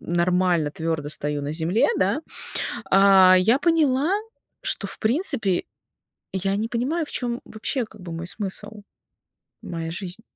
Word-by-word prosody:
нормально, 175 Hz, -2 st, +1 dB
твёрдо 160 Hz, -1 st, -3 dB
стою 145 Hz, -1 st, 0 dB
на 145 Hz, +1 st, -3 dB
земле, 170 Hz, +7 st, +1 dB
да, 200 Hz, +9 st, +1 dB, 0.7 s
а, 195 Hz, -1 st, +7 dB
я 225 Hz, +9 st, +3 dB
поняла, 310 Hz, -3 st, +2 dB, 0.5 s
что, -, -, 0 dB
в -, -, -5 dB
принципе, 230 Hz, -, +1 dB, 0.7 s
я 195 Hz, +1 st, 0 dB
не 220 Hz, +2 st, -2 dB
понимаю, 290 Hz, +8 st, -1 dB
в -, -, -10 dB
чём 240 Hz, 0 st, -2 dB
вообще, 235 Hz, +3 st, -2 dB
как 215 Hz, -2 st, -15 dB
бы, 170 Hz, -2 st, -7 dB
мой 165 Hz, +1 st, -5 dB
смысл, 205 Hz, +2 st, -5 dB, 0.8 s
моя 165 Hz, -1 st, -5 dB
жизнь. 180 Hz, +4 st, -6 dB
195 Hz, 140 wpm, -24 LUFS, 170-235 Hz, 0.8 s, а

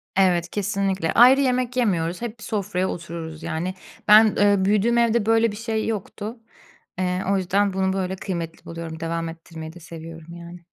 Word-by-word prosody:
Evet, 180 Hz, -3 st, +3 dB
kesinlikle. 195 Hz, -4 st, -1 dB
Ayrı 255 Hz, +3 st, +7 dB
yemek 255 Hz, -1 st, 0 dB
yemiyoruz, 180 Hz, -7 st, 0 dB
hep 235 Hz, -1 st, -5 dB
bir -, -, -11 dB
sofraya 190 Hz, -4 st, -1 dB
otururuz 165 Hz, -2 st, -7 dB
yani. 175 Hz, +4 st, -3 dB, 0.3 s
Ben, 215 Hz, +1 st, +9 dB
ııı, 200 Hz, -2 st, +3 dB
büyüdüğüm 210 Hz, +4 st, +2 dB
evde 235 Hz, -2 st, +2 dB
böyle 225 Hz, 0 st, +3 dB
bir -, -, -7 dB
şey 220 Hz, -1 st, -2 dB
yoktu. 220 Hz, +1 st, -5 dB, 0.6 s
Eee, 180 Hz, 0 st, 0 dB
o 200 Hz, -, +3 dB
yüzden 195 Hz, +2 st, +1 dB
bunu 190 Hz, 0 st, 0 dB
böyle 190 Hz, -1 st, -2 dB
kıymetli 170 Hz, -4 st, -5 dB
buluyorum, 165 Hz, -1 st, -7 dB
devam 165 Hz, 0 st, -3 dB
ettirmeyi 165 Hz, -1 st, -9 dB
de 175 Hz, -, -12 dB
seviyorum 165 Hz, 0 st, -10 dB
yani. 170 Hz, +1 st, -10 dB
190 Hz, 170 wpm, -23 LUFS, 170-215 Hz, 0.6 s, Ben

